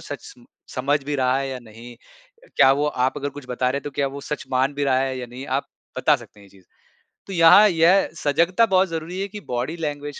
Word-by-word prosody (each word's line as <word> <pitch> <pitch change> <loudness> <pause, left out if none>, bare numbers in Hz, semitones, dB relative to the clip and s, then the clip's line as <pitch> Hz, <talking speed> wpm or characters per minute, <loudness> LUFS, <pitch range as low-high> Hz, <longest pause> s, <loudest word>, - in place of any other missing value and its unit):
सच - - -8
स - - -14 0.3
समझ 140 +3 0
भी 145 +1 -3
रहा 130 -1 +1
है 135 0 -3
या 130 -1 -5
नहीं 120 +1 -13
अ, - - -25
क्या 135 -1 +6
वो 145 +2 0
आप 130 -1 -1
अगर 145 0 -3
कुछ 145 -2 -11
बता 125 0 -1
रहे 140 - -1
हैं - - -11
तो 145 - -5
क्या 140 0 -1
वो 140 +1 -8
सच 150 - -5
मान 130 +2 +1
भी 145 0 -1
रहा 130 -2 +2
है 135 -1 -2
या 125 - -6
नहीं 125 +3 -9
आप - - -8 0.3
बता - - +3
सकते 105 - -16
हैं - - -16
ये - - -22
चीज़। 95 -1 -21 0.6
तो 195 - -6
यहाँ 170 +5 +7
यह 175 +2 +3
सजगता 170 +10 +2
बहुत 190 -3 +2
ज़रूरी 165 +3 -5
है 200 - -2
कि 210 +1 -9
बॉडी 125 +6 -3
लैंग्वेज 145 -2 -5
145 Hz, 255 wpm, -22 LUFS, 130-165 Hz, 0.6 s, यहाँ